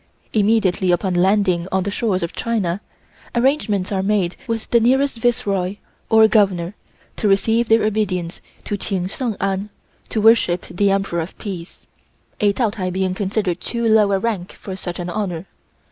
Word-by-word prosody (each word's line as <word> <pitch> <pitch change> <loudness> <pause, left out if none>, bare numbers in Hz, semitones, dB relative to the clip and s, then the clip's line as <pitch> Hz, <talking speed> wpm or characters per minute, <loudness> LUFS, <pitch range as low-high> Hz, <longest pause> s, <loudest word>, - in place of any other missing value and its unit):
Immediately 200 -4 +2
upon 185 +1 +1
landing 185 -1 +2
on 190 0 +1
the 200 - -2
shores 200 -5 0
of 170 - -4
China, 205 -5 -1 0.5
arrangements 235 -7 +1
are 190 -2 0
made 195 -3 0
with 225 -1 -3
the 235 - +6
nearest 265 +3 +2
Viceroy 200 -5 0 0.3
or 220 -1 +7
Governor 195 -5 +2 0.4
to 215 - 0
receive 225 +4 +2
their 225 0 +5
obeisance 190 -5 -1 0.2
to 205 - -3
Ching 190 -3 -2
Sheng 225 +3 -3
An 195 +1 -1 0.4
(to 220 - -1
worship 210 -5 +4
the 200 +3 +2
Emperor 195 -3 0
of 165 - -7
Peace), 185 -4 -8 0.5
a 205 -3 +4
Taotai 200 -4 -1
being 190 0 -1
considered 200 0 -1
of - - -37
too 235 -1 -2
low 215 -2 +4
a 195 - +3
rank 200 -4 -3
for 190 - -8
such 175 -2 -5
an 175 0 -4
honor. 180 -4 -3
200 Hz, 165 wpm, -20 LUFS, 185-220 Hz, 0.5 s, or